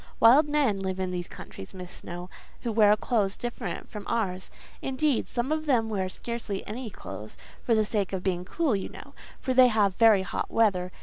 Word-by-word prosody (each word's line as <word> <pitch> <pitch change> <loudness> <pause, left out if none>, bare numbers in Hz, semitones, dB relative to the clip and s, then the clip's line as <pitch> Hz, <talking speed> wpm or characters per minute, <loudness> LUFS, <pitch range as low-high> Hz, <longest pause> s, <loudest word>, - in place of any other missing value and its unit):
Wild 275 +7 +7
men 280 -9 +2
live 190 -1 -3
in 185 -1 -1
these 175 -1 -3
countries, 95 - -10
Miss 180 -1 -8
Snowe, 175 0 -8 0.3
who 235 - -2
wear 210 -1 +6
clothes 210 -3 0
different 240 -1 -5
from 210 -3 -8
ours: 190 -5 -1 0.3
indeed, 270 0 0
some 240 +4 -1
of 310 0 -1
them 230 -5 +2
wear 190 -3 -1
scarcely 230 -1 -5
any 235 +2 -5
clothes, 110 - -9 0.3
for 230 - +3
the 215 -1 +3
sake 205 -3 -1
of 190 -2 -3
being 180 -2 0
cool, 290 - 0
you 195 - -3
know; - - -12 0.3
for 260 - -1
they 255 0 +8
have 210 -4 +2
very 215 -2 +5
hot 190 - -3
weather. 185 -5 +2
215 Hz, 195 wpm, -27 LUFS, 190-240 Hz, 0.3 s, they